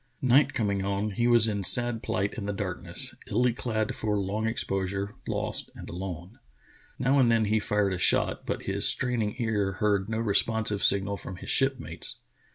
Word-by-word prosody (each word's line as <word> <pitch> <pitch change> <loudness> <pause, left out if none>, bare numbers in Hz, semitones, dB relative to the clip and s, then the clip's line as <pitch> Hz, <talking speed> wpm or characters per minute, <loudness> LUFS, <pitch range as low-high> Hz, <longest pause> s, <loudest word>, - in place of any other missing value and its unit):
Night 130 +3 +3
com 105 -3 0
ing 100 -1 -2
on, 100 +2 -2
he 120 +5 0
was 120 -2 +5
in 100 -2 -2
sad 120 +2 +5
plight 100 -1 -2
in 105 -4 -6
the 105 - -2
darkness, 95 -2 -4
illy 120 +3 +1
clad 110 -3 -2
for 105 -1 -1
long 100 +3 -2
exposure, 100 -2 -2
lost - - -3
and - - -10
alone. 90 +3 -7 0.6
Now 135 +2 +2
and 120 -3 +4
then 115 -1 +2
he 110 +1 +1
fired 105 -2 0
a 90 - -4
shot, - - +3
but - - -4
his - - +3
straining 120 -5 0
ears 105 -5 -1
heard 105 -1 0
no 110 - -2
responsive 110 -1 +1
signal 100 0 +2
from 95 - -8
his 95 +6 -5
shipmates. 135 -1 0
105 Hz, 180 wpm, -27 LUFS, 100-115 Hz, 0.6 s, was